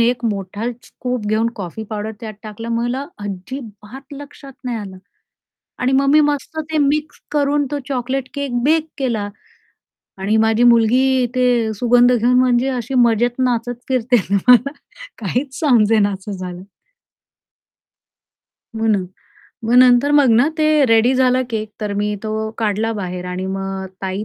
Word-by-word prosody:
एक 235 +1 +1
मोठा 205 +2 -3
स्कूप 250 -4 -5
घेऊन 220 +2 +1
कॉफी 195 +2 -6
पावडर 215 +1 -4
त्यात 220 -2 -7
टाकलं 220 +1 -8
मला 240 +4 -2 0.2
अजिबात 220 +6 -8
लक्षात 285 -1 -11
नाही 245 -2 -2
आलं. 195 -3 -8 0.8
आणि 250 +1 +1
मग 275 +1 +3
मी 300 +2 +6
मस्त 295 +1 -1
ते 315 - 0
मिक्स 295 +1 0
करून 290 0 +1
तो 290 - -2
चॉकलेट 260 0 -2
केक 275 -4 -2
बेक 315 +3 +2
केला. 235 -7 -1 0.9
आणि 200 +3 0
माझी 220 +1 +2
मुलगी 235 +1 +4 0.2
इथे 245 -2 +1
सुगंध 245 +3 +4
घेऊन 245 +1 +2
म्हणजे 250 0 +2
अशी 255 0 -3
मजेत 240 +1 +2
नाचत 245 -1 0
फिरतये 250 -1 +2
ना 200 - +3
मला 250 +2 +6 0.5
काहीच 250 +6 -3
समजेना 220 -7 +3
असं 195 +1 -7
झालं. 180 -2 -7 2.1
म्हणून. 215 -4 +1 0.6
मग 230 +2 +1
नंतर 255 +2 +5
मग 290 -4 +5
ना, 240 +6 +4
ते 305 -1 +4
रेडी 230 +2 +4
झालं 255 0 +3
केक, 220 -1 -3
तर 210 -1 -2
मी 210 +1 -1
तो 220 0 -3
काढला 220 0 0
बाहेर 180 -4 -5
आणि 180 +1 -4
मग 195 0 -4 0.2
ताई 190 +2 -3
235 Hz, 145 wpm, -19 LUFS, 215-260 Hz, 2.1 s, मी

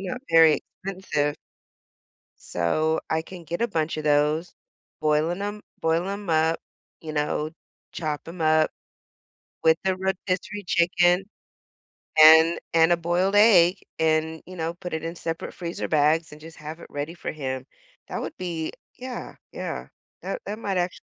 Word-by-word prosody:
not 200 +7 -5
very 165 -2 +7 0.3
expensive. 185 -7 -1 1.0
So, 155 - 0
I 160 - +2
can 180 +1 -10
get 170 +2 -5
a - - +3
bunch 160 -7 -1
of 155 - -4
those, 150 +3 +2 0.5
boiling 155 +4 +1
‘em 205 +1 -4 0.2
boil 165 +2 +1
‘em 200 -2 -4
up, 160 +1 +2 0.4
you 155 -1 -6
know, 150 +1 -1 0.4
chop 155 -1 -4
‘em 170 +1 -9
up 155 0 +4 0.9
with 160 0 +5
the 190 -1 +2
rotisserie 190 +2 -2
chicken 175 +2 +3 0.9
and 160 +2 +8 0.2
and 165 +1 +5
a 175 - +5
boiled 175 +4 +1
egg 190 -5 +7 0.2
and, 160 0 +1
you 185 0 -11
know, 165 +1 -2
put 180 0 -8
it 160 0 -3
in 165 +1 -4
separate 165 -1 -5
freezer 170 -1 -4
bags 155 +2 +2
and 150 - -11
just 160 +1 -12
have 155 +2 -8
it - - -12
ready 145 +3 -4
for 175 - -5
him. 130 -3 -4 0.4
That - - -4
would - - -6
be 170 -3 -3 0.3
yeah, 255 0 -7 0.2
yeah. - - -5 0.4
That - - -4
that 215 - -4
might 200 -4 -2
actu 180 0 -1
165 Hz, 155 wpm, -25 LUFS, 155-180 Hz, 1.0 s, and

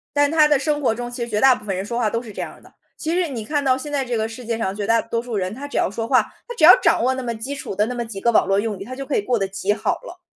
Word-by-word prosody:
但 290 0 +3
他 310 -2 +5
的 295 -1 +4
生 295 +1 -1
活 255 - +2
中 240 +1 -5
其 240 0 -4
实 - - -4
绝 210 -1 0
大 265 -1 +7
部 - - -12
分 195 -2 -2
人 190 +2 -3
说 235 +3 -3
话 230 - +2
都 230 +2 -2
是 230 -3 -10
这 - - -10
样 - - -8
的， - - -19 0.3
其 325 +1 -2
实 360 -1 +1
你 245 -7 -5
看 290 +6 -1
到 260 -1 +4
现 265 +3 -6
在 280 -2 0
这 245 -1 -2
个 220 -1 0
世 235 +2 -9
界 230 0 -2
上 190 -3 -2
绝 205 -1 -3
大 230 +2 +3
多 230 - -3
数 240 -2 -5
人 190 +1 -2
他 280 +3 -7
只 285 - -10
要 - - +2
说 225 +3 -4
话 255 +1 +5 0.3
他 485 - -5
只 - - -3
要 - - +11
掌 - - +3
握 260 +2 +2
那 260 - -4
么 235 -1 -2
基 240 +6 -5
础 235 - -6
的 210 +2 +1
那 250 - -4
么 240 -1 -3
几 220 -3 -7
个 235 - +3
网 220 - +4
络 195 0 +2
用 210 -1 -2
语， 195 - -8
他 255 +3 -7
就 270 0 -7
可 290 - 0
以 - - +1
过 240 +1 0
得 195 - 0
极 195 +1 -1
好 - - 0
了。 - - -11
235 Hz, 400 characters per minute, -21 LUFS, 215-270 Hz, 0.3 s, 要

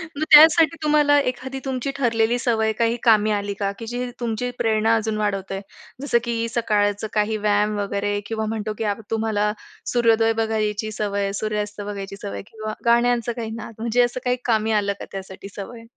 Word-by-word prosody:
मग 310 - -2
त्यासाठी 315 +1 +8
तुम्हाला 295 -1 +4
एखादी 265 +2 -7
तुमची 265 0 -2
ठरलेली 235 -2 +2
सवय 220 -3 +1
काही 230 +1 +2
कामी 215 -2 +4
आली 205 -1 -1
का? 200 -1 0
की 230 - -6
जी 245 +1 -3
तुमची 240 +1 -2
प्रेरणा 220 0 +2
अजून 220 -1 -1
वाढवतोय, 195 -2 -2 0.4
जसं, 285 -4 +2
की 230 -1 -1
सकाळचं 205 -2 +1
काही 215 0 +1
व्यायाम 210 0 +1
वगैरे 205 0 -1
किंवा 220 0 -3
म्हणतो 215 -1 -3
की - - -3
आप 225 - -12
तुम्हाला 215 -2 0 0.4
सूर्योदय 225 -2 +3
बघायची 215 -1 -1
सवय 205 -1 -2
आहे, 195 0 -2
सूर्यास्त 210 0 -3
बघायची 200 -1 -6
सवय 200 - -5
आहे - - -6
किंवा 215 -1 -5
गाण्यांचं 240 0 +3
काही 230 -2 -5
नाद 230 0 -8
म्हणजे 235 +2 +2
असं 240 +1 -1
काही 250 0 +1
कामी 220 -2 +1
आलं 200 0 -1
का - - -6
त्यासाठी 190 0 -8
सवय? 230 +3 -8
220 Hz, 180 wpm, -22 LUFS, 210-235 Hz, 0.4 s, त्यासाठी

